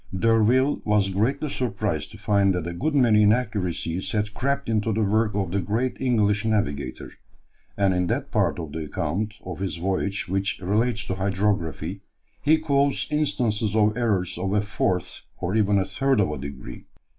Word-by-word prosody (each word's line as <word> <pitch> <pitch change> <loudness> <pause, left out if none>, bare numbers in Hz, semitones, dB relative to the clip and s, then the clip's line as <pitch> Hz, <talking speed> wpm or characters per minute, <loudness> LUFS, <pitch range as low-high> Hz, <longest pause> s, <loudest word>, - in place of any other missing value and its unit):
D'Urville 115 +6 +3
was 105 -2 +2
greatly 120 +10 0
surprised 125 -3 -2
to - - -12
find 100 -2 +2
that 90 -2 -3
a 85 - -4
good 145 - -1
many 115 -6 +5
inaccuracies 100 -5 0
had 105 -1 -1
crept 140 +5 -1
into 110 0 +1
the 110 +1 +1
work 105 +1 +1
of 95 -4 -1
the 100 +1 0
great 115 +7 -1
English 105 -5 +2
navigator, 70 - -2 0.7
and 100 -2 +3
in 90 0 0
that - - -2
part - - +1
of 80 -4 -6
the 80 +1 -4
account 100 +9 -2
of 90 -1 -6
his 95 -1 -3
voyage 95 +3 -1
which 95 +2 -1
relates 105 +4 0
to - - -2
hydrography, 95 -2 -1 0.4
he 155 +2 +4
quotes 140 -2 +1
instances 115 -8 0
of 105 -1 +3
errors 95 -7 0
of 95 +1 -1
a 105 - +3
fourth, 95 -3 -2 0.2
or 95 +4 -2
even 100 -3 +3
third 135 +7 +1
of 95 -7 +2
a 75 - -5
degree. 70 -2 -8
105 Hz, 170 wpm, -24 LUFS, 95-115 Hz, 0.7 s, many